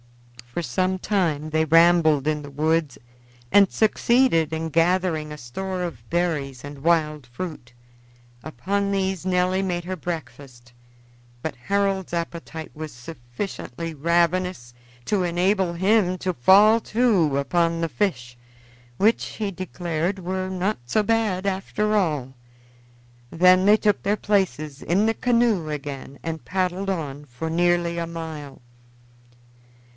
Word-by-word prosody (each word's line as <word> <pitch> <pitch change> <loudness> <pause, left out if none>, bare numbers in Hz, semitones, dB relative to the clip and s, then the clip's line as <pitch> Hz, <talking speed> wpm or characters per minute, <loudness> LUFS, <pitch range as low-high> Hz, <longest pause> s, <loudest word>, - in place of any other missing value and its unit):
For 125 +8 -4
some 185 +3 -1
time 160 -7 -1
they 160 0 +2
rambled 160 -2 +4
in 150 -1 0
the 145 - -9
woods 155 -1 0 0.6
and 200 -1 +6
succeeded 220 - +2
in 160 0 -3
gathering 165 -1 +1
a 150 - -7
store 185 +9 -5
of 120 -10 -7
berries 150 -7 -1
and 145 -1 -10
wild 155 -4 +1
fruit. 125 -1 -7 0.7
Upon 200 +8 -2
these 190 -2 -1
Nelly 185 +1 +1
made 175 -2 -2
her 185 +1 -3
breakfast, 140 -8 -8 0.7
but 160 - -3
Harold's 195 +7 -1
appetite 170 -1 -5
was 155 -1 -7
sufficiently 125 +4 -7
ravenous 170 -3 0 0.3
to 195 +3 +1
enable 180 +1 +1
him 185 +1 +2
to 185 0 -2
fall 205 - +6
to 205 - +2
upon 165 +4 +1
the 165 - 0
fish, 125 - -2 0.6
which, 220 +3 +3
he 210 -2 -4
declared, 175 0 -3
were 185 +1 -3
not 190 0 -1
so 215 - +1
bad, 210 -4 0
after 205 +2 -1
all. 150 -10 0 1.0
Then 185 +4 +5
they 210 +1 +6
took 210 -2 +1
their 205 +2 0
places 165 -10 -1
in 185 +7 +1
the 225 - +2
canoe 230 -9 +1
again 140 -2 -6
and 160 -1 -4
paddled 185 +1 -1
on 150 -6 -4
for 145 +4 -6
nearly 170 0 +1
a 170 - -3
mile. 160 -5 -7
170 Hz, 130 wpm, -23 LUFS, 150-190 Hz, 1.0 s, and